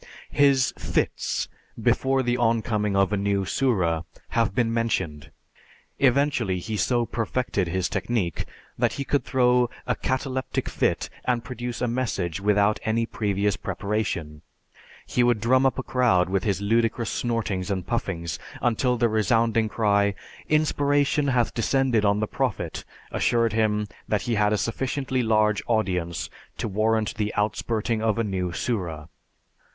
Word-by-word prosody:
His 140 -3 +4
"fits" - - -1 0.3
before 135 0 +2
the 120 0 +1
oncoming 115 -3 +1
of 100 +1 +3
a - - +2
new 100 0 0
Sura 90 -9 +1 0.3
have 115 -4 +1
been 115 -2 +1
mentioned. 80 -11 -1 0.7
Eventually, 130 -7 +2
he 110 +5 -4
so 120 +2 +1
perfected 115 -4 -1
his 90 +1 0
technique 105 -9 -1 0.3
that - - +2
he 140 - -3
could 145 +1 0
throw 125 -1 +3 0.2
a - - 0
cataleptic 130 0 -2
fit - - 0
and 120 -2 +1
produce 120 -1 -5
a - - +2
message 115 -9 -2
without 105 +1 +3
any 115 +1 0
previous 100 -3 0
preparation. 100 -9 -3 0.6
He 125 - 0
would 120 -2 +3
drum 130 +4 +4
up 130 - -1
a 130 - -2
crowd 120 -10 +2
with 95 +2 0
his 100 -2 0
ludicrous 115 +2 +1
snortings 110 -6 -2
and 95 -3 -2
puffings 85 -9 -3 0.2
until 125 +1 +1
the 120 0 +3
resounding 110 +1 +2
cry, 100 -2 +2 0.3
"Inspiration 145 -1 +2
hath 125 -4 +1
descended 125 -1 +2
on 100 0 +3
the 110 - 0
Prophet!" - - -2 0.3
assured 115 -2 +2
him 105 -1 +1 0.2
that 105 - 0
he 120 - -1
had 105 -1 +2
a 105 - +2
sufficiently 130 +3 -1
large 110 -2 +2
audience 90 -7 0 0.3
to 115 - -2
warrant 110 +1 +1
the 105 -1 -1
out 105 +1 +1
spurting 115 0 -1
of 110 -1 +1
a 115 - +1
new 95 -4 -2
Sura. 85 -7 -3
110 Hz, 145 wpm, -25 LUFS, 100-120 Hz, 0.7 s, His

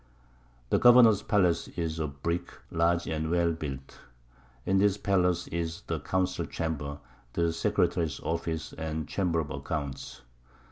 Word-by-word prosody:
The - - +4
Governour's 120 -4 +7
Pallace 95 -6 +2
is 80 -1 -2
of 70 -3 -5
Brick, 85 +1 -1 0.2
large 85 +1 +2
and 80 0 -2
well 85 0 +2
built. 70 -4 -6 0.7
In 95 0 +3
this 100 0 +3
Pallace 90 -3 +1
is 85 0 -3
the - - -2
Council 95 0 -1
Chamber, 75 -3 -3 0.4
the 85 -1 +1
Secretary's 80 -2 0
Office 80 -1 -3
and 80 -1 -4
Chamber 90 -4 0
of 70 - -7
Accounts. 70 -5 -5
85 Hz, 135 wpm, -29 LUFS, 80-90 Hz, 0.7 s, Governour's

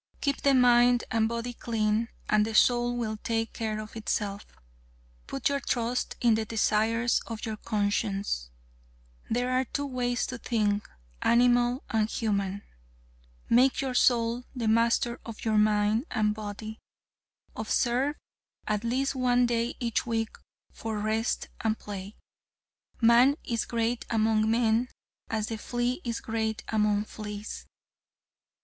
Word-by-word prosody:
Keep 280 -1 0
the 275 -1 +4
mind 245 -1 +5
and 220 0 +2
body 235 +1 -3
clean 220 -1 0 0.2
and 210 0 +4
the 220 0 -3
soul 240 +1 +4
will 220 -2 -2
take 225 +1 -2
care 220 -2 -3
of 215 +1 -8
itself. 210 -2 -2 0.8
Put 135 - -1
your 280 0 0
trust 240 -1 -1
in 235 -2 +4
the 220 0 +1
desires 225 +2 +1
of 225 0 -5
your 220 -1 -4
conscience. 205 - -1 0.8
There 245 +2 0
are 255 +1 +2
two 285 +3 -3
ways 245 -2 -1
to 255 - -6
think 210 -4 0 0.3
animal 245 +2 +3
and 220 -1 +1
human. 200 -3 -1 0.8
Make 255 +3 +4
your 270 -2 -1
soul 240 0 +2
the 235 -3 -2
master 230 +2 +2
of 230 -1 -8
your 215 -1 +3
mind 210 +3 +2
and 215 -3 +1
body. 215 +1 -7 0.8
Observe 245 +6 0 0.5
at 210 0 0
least 260 +4 0
one 250 -2 +3
day 235 0 0
each 240 -1 -1
week 225 -1 -1 0.4
for 220 -1 -4
rest 220 +2 -1 0.2
and 220 0 +1
play. 200 0 -7 0.9
Man 240 +4 +6
is 230 -2 -1
great 235 +1 -1
among 220 -1 +2
men 230 +1 +2 0.4
as 220 -1 -1
the 225 -1 -4
flea 245 +6 -2
is 235 -1 -3
great 220 -1 -2
among 210 -1 +2
fleas. 210 0 -7
230 Hz, 135 wpm, -28 LUFS, 215-245 Hz, 0.9 s, Man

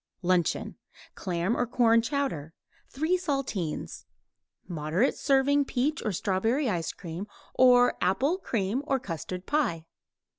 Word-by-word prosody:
LUNCHEON 175 -1 0 0.4
Clam 180 +3 -1
or 245 - 0
corn 230 -1 +4
chowder; 230 - -2 0.3
3 315 +7 0
saltines; 275 - -3 0.6
moderate 170 - 0
serving 280 +1 +3
peach 275 +4 -1
or 215 - 0
strawberry 225 - 0
ice 175 -6 -1
cream, 175 +2 -7 0.3
or 245 -1 +6
apple, 270 - +1
cream, 225 - -1
or 270 -1 +1
custard 180 - -6
pie. 235 - 0
230 Hz, 115 wpm, -28 LUFS, 180-275 Hz, 0.6 s, or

